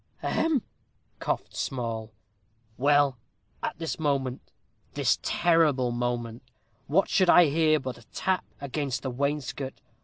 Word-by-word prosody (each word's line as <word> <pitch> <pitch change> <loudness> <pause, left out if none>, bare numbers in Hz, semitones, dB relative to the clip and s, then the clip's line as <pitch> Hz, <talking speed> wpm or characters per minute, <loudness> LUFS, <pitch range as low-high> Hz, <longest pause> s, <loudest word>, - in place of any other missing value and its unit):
"Ahem!" 315 -7 +1 0.6
coughed - - -3
Small. 115 -4 -3 0.6
"Well, 140 -1 +3 0.4
at - - -3
this 165 -1 -4
moment 135 -4 0 0.5
this - - +2
terrible 155 -8 +3
moment 120 -1 -2 0.5
what 185 +7 +3
should 185 -2 +3
I 175 - +8
hear 155 +1 +3
but 130 -4 -6
a 115 - -18
tap 190 +9 -1 0.2
against 140 -2 -3
the 130 - -2
wainscot. 140 0 -2
140 Hz, 120 wpm, -27 LUFS, 125-160 Hz, 0.6 s, I